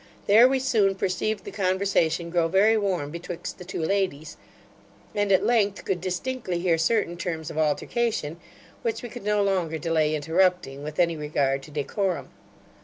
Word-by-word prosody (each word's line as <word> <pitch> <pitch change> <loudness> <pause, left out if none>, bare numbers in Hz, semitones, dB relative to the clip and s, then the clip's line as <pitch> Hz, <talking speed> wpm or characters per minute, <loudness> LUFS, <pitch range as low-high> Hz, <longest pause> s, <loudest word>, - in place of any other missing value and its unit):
There 220 +5 +7
we 265 +1 +2
soon 220 -7 +2
perceived 195 +3 -1
the - - -7
conversation 185 -4 0
grow 170 -1 +2
very 200 +6 +4
warm 185 -9 -1
betwixt 170 +1 -6
the - - -7
two 175 -2 -4
ladies; 180 -5 -1 0.8
and, 205 -1 0
at 190 - +4
length, 210 -4 +1
could 180 -3 -1
distinctly 185 +1 -3
hear 170 -2 +1
certain 175 0 +1
terms 165 -3 -4
of 155 - -4
altercation, 165 +2 -1 0.4
which 455 - -2
we 240 - -5
could 245 -2 -9
no 210 0 +2
longer 180 -5 0
delay 155 -1 +1
interrupting, 160 -2 +1
with 150 +1 -7
any 170 -1 +3
regard 145 -3 0
to 140 - -13
decorum. 150 +1 -2
180 Hz, 165 wpm, -25 LUFS, 160-205 Hz, 0.8 s, There